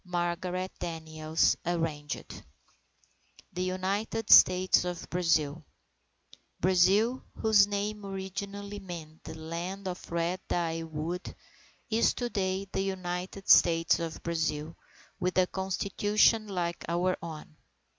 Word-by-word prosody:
Margarette 180 +1 -3
Daniels 160 -1 0
(Arranged) 160 -4 -3 1.1
THE 180 - -3
UNITED 195 +4 -2
STATES 185 0 +7
OF 180 -1 -5
BRAZIL 165 -3 +1 1.0
Brazil, 190 +8 +3
whose 210 -2 +5
name 205 +1 -3
originally 200 +1 -5
meant 165 -5 -9
the - - -8
Land 175 +5 -5
of 180 -1 -6
Red 170 +2 -1
Dye 165 -1 -1
Wood, 165 +3 -5 0.6
is 225 +1 +3
to 240 -1 -3
day, 190 -1 -1
the - - 0
United 185 0 -4
States 165 -1 +5
of 165 -1 -5
Brazil 160 -1 -2 0.4
with 180 +1 -1
a 185 - +5
Constitution 205 +4 +1
like 175 -3 -3
our 180 +2 +1
own. 155 -2 -9
180 Hz, 110 wpm, -29 LUFS, 165-195 Hz, 1.1 s, STATES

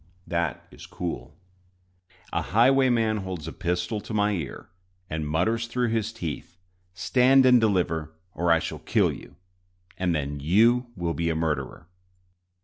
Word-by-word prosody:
That 85 -4 -2
is - - -12
cool. 65 +6 -6 1.0
A - - +1
highwayman 120 -1 +3
holds 95 -6 -5
a 80 - -6
pistol 90 +3 -2
to 110 - -6
my 105 0 +2
ear, 80 -11 -5 0.4
and 80 -1 -2
mutters 110 +9 0
through 120 0 0
his 110 -1 -1
teeth, 85 -4 -6 0.4
"Stand 130 +6 +4
and 125 -2 +6
deliver, 90 -7 0 0.2
or 85 -1 +1
I 85 - +6
shall - - -4
kill - - +2
you, - - -12 0.6
and 90 -2 +1
then 70 -1 -3
you 115 - +3
will 85 -3 -2
be 85 0 -1
a 80 - 0
murderer!" 75 -5 -3
90 Hz, 145 wpm, -26 LUFS, 80-115 Hz, 1.0 s, and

